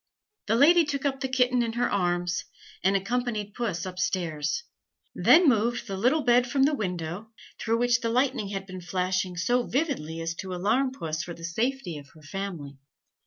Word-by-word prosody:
The 220 - +2
lady 330 +7 +6
took 290 -2 -3
up 270 -1 0
the 265 - -1
kitten 250 -1 +2
in 230 -1 -1
her 240 +1 +1
arms, 175 -2 0 0.4
and 195 +1 +3
accompanied 215 0 -1
Puss 210 -9 -2
up 185 -1 -6
stairs, 175 - -1 0.5
then 345 0 +6
moved 235 -1 +2
the 195 -4 -4
little 255 +10 +2
bed 245 0 +4
from 270 -1 +2
the 295 +3 +3
window, 180 - -4 0.3
through 225 0 +1
which 245 +1 +3
the 230 - -1
lightning 255 -2 +1
had 195 -1 -4
been 185 -1 -8
flashing 185 0 -1
so 245 +8 +2
vividly 250 - -2
as 165 0 -2
to 185 -1 -5
alarm 225 +9 +1
Puss 160 - -4
for 170 0 -7
the 165 - -13
safety 220 - -2
of 140 0 -14
her 155 - -16
family. 155 -5 -6
210 Hz, 185 wpm, -27 LUFS, 180-250 Hz, 0.5 s, lady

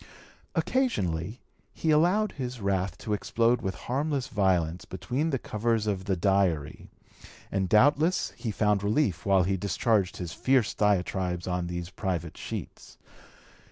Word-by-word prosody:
Occasionally 125 - 0 0.3
he 160 - 0
allowed 180 +7 +3
his 125 -3 -5
wrath 95 -3 -1
to 105 - -3
explode 115 +3 +1
with 95 -2 -3
harmless 140 0 -1
violence 90 -5 +1
between 130 +11 -2
the 135 - 0
covers 115 -1 -1
of 95 -3 -2
the 100 -2 +1
Diary, 90 -5 0 0.6
and 95 -2 0
doubtless 145 - +3
he 120 - -4
found 105 -1 +1
relief 100 - 0
while 95 -2 +5
he 95 +2 0
discharged 100 +1 +1
his 85 -2 -5
fierce 130 -4 +2
diatribes 90 -3 0
on 90 -1 -1
these 85 0 -5
private 90 -3 -3
sheets. - - -7
100 Hz, 135 wpm, -28 LUFS, 90-125 Hz, 0.6 s, while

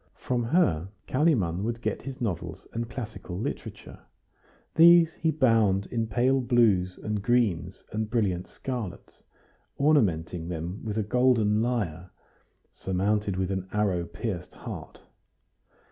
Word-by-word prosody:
From 125 -1 -1
her, 115 - +2 0.2
Kalimann 120 - +2
would 115 +1 -2
get - - -2
his 135 -1 -7
novels 100 -9 -4
and 115 0 -3
classical 105 -7 -6
literature; 105 - -6 0.7
these 170 0 +7
he 165 - -1
bound 115 -10 +3
in 115 -2 -1
pale 125 +5 +2
blues 105 -7 +2
and 105 -1 -3
greens 100 -6 0
and 110 0 -2
brilliant 100 -6 0
scarlets, 120 -9 -6 0.6
ornamenting 90 - +2
them 85 +3 -5
with 110 -1 -3
a 110 - +1
golden 110 -2 +3
lyre, 95 -8 -2 0.6
surmounted 100 +1 -1
with 95 0 -1
an 95 -1 -3
arrow 100 -4 +1
pierced 85 +1 -5
heart. - - -8
105 Hz, 125 wpm, -27 LUFS, 95-120 Hz, 0.7 s, these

